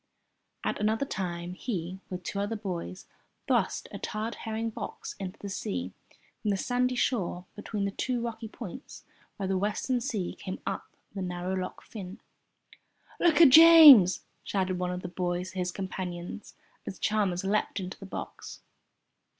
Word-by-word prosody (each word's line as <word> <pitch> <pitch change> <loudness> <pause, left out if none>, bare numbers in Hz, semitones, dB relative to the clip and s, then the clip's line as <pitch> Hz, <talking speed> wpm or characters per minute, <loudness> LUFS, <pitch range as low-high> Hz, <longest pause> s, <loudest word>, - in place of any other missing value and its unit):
At - - -1
another 220 +5 +1
time 175 -6 -4
he, 185 -3 -4
with 180 -1 -5
two 200 - -3
other 205 +3 -1
boys, 180 - -5 0.4
thrust - - +1
a - - -6
tarred 215 +2 -3
herring 225 0 -3
box - - -6
into 190 -1 -5
the 205 - -7
sea 90 - -3 0.5
from 210 - -1
the 200 - +2
sandy 250 +4 0
shore 190 -7 0
between 210 -1 -3
the 200 - -1
two 250 +4 -1
rocky 230 -1 -4
points 230 +2 -9 0.3
where 195 - -3
the 190 0 0
western 215 +5 0
sea 220 -8 -2
came 185 - -5
up 195 - -3 0.3
the 195 - -4
narrow 180 0 -3
Loch 185 -1 -4
Fyne. 195 -1 -8 1.0
"Look 335 -2 +4
at 315 - +10
James!" 300 - +10 0.2
shouted 185 -2 -1
one 180 0 -1
of 180 0 -4
the - - -3
boys 180 0 -2
to 190 - -6
his 180 0 -1
companions 185 0 -6 0.3
as 190 - -5
Chalmers 200 -4 0
leapt 205 +1 0
into 185 0 -6
the 195 - -9
box. - - -7
195 Hz, 160 wpm, -29 LUFS, 180-225 Hz, 1.0 s, at